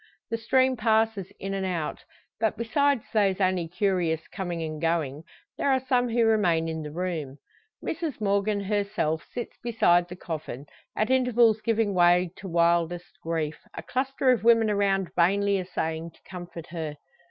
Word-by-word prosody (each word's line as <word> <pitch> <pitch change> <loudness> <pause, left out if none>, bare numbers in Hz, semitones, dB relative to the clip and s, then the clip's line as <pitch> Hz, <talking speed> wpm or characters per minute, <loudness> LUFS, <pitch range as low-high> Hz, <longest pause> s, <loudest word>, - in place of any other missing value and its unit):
The 230 - 0
stream 260 +3 +3
passes 220 -3 +1
in 195 0 -4
and 195 -1 -2
out; 175 -5 -3 0.3
but 220 -1 0
besides 275 +2 +1
those 200 -3 +2
only 185 -3 +1
curious 175 -3 0
coming 175 -4 -4
and 155 -1 -5
going, 160 -3 -1 0.4
there 280 - +2
are 265 - +3
some 250 -1 +1
who 230 0 +2
remain 180 -7 +2
in 160 -1 -3
the 150 - -6
room. 160 -5 -3 0.5
Mrs 320 -6 -3
Morgan 200 0 +1
herself 200 -6 -1
sits 240 - -6
beside 175 -7 +3
the 180 - -7
coffin, 155 -6 -6 0.3
at 215 +4 0
intervals 240 -4 +4
giving 225 -2 +1
way 175 0 +4
to 195 - -8
wildest 170 0 +1
grief; 160 -2 -2 0.2
a - - -6
cluster 265 0 +1
of 245 - +1
women 230 -2 +5
around 195 -2 +1
vainly 200 +3 +3
essaying 165 -2 -3
to - - -24
comfort 175 -3 -8
her. 160 -3 -4
195 Hz, 160 wpm, -27 LUFS, 170-225 Hz, 0.5 s, women